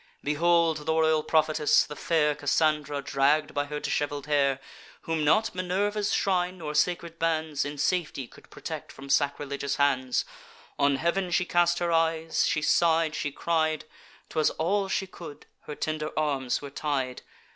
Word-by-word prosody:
Behold 165 +2 +2
the 160 - +2
royal 160 -1 +3
prophetess, 155 -1 +3
the 150 - -8
fair 150 -2 +1
Cassandra, 145 0 0
dragg'd 140 +2 +1
by 145 0 0
her 150 +1 -5
dishevel'd 145 -1 -2
hair, 140 -2 +2 0.4
Whom 165 -1 -2
not 215 +10 +3
Minerva's 200 +3 -1
shrine, 185 -1 0
nor 155 -3 -5
sacred 170 +1 0
bands, 160 -3 0
In 145 0 -5
safety 150 -3 -1
could - - -18
protect - - -7
from 135 0 -8
sacrilegious 140 -1 0
hands: 130 -3 +1 0.5
On 140 -1 +3
heav'n 170 +5 0
she 180 +1 +1
cast 175 -1 +2
her 175 -1 -1
eyes, 165 0 +1
she 155 - 0
sigh'd, 165 0 +3
she 145 - -2
cried, 155 0 0 0.4
('Twas 155 - +2
all 195 +5 0
she 195 - -1
could) 170 -5 -11 0.2
her 150 - -6
tender 155 0 -3
arms 140 -4 0
were 140 - -7
tied. 135 -4 -2
155 Hz, 155 wpm, -27 LUFS, 145-170 Hz, 0.5 s, royal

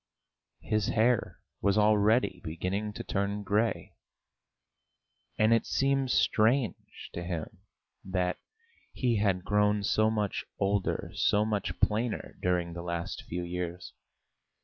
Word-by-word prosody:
His 110 -2 0
hair 115 +1 +1 0.2
was 100 0 +2
already 105 -2 +3
beginning 90 +6 -3
to - - -6
turn 100 +1 -2
grey. 105 +4 0 1.4
And 110 +1 +4
it 115 - +2
seemed 135 -1 +1
strange 115 -2 +1
to 85 - -4
him 85 -3 -5 0.4
that 90 -1 -1 0.5
he 120 -3 +1
had 95 -3 +1
grown 105 0 +2
so 110 +2 +3
much 105 -2 -1
older, 100 0 0
so 105 +1 +2
much 105 -3 -2
plainer 110 +2 0
during 90 -2 0
the 85 - -6
last 85 -1 -4
few 90 +1 -3
years. 90 0 -5
105 Hz, 120 wpm, -29 LUFS, 90-110 Hz, 1.4 s, And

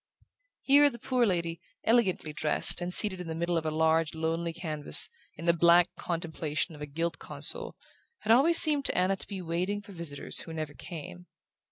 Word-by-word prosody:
Here 285 +1 +5
the 235 - -10
poor 245 0 0
lady, 170 -3 -2 0.2
elegantly 200 -9 +1
dressed, 150 +3 0
and 175 +1 -3
seated 190 -1 +6
in 180 - -8
the 160 - -5
middle 170 +1 -2
of 160 -1 -2
a - - +1
large 160 0 +1
lonely 165 +1 -2
canvas, 160 -3 +1 0.3
in 165 - -9
the 170 - +4
blank 170 +1 +4
contemplation 165 -2 -4
of 150 - -13
a 150 - -5
gilt 165 +3 -4
console, - - -1 0.5
had 220 - 0
always 300 +8 +5
seemed 295 -3 +3
to - - -1
Anna 185 +2 +2
to - - -5
be 195 -3 -7
waiting 180 +5 -2
for 205 0 -14
visitors 170 -6 -1
who 165 - -8
never 155 -2 -5
came. 145 - -10
170 Hz, 190 wpm, -28 LUFS, 160-195 Hz, 0.5 s, seated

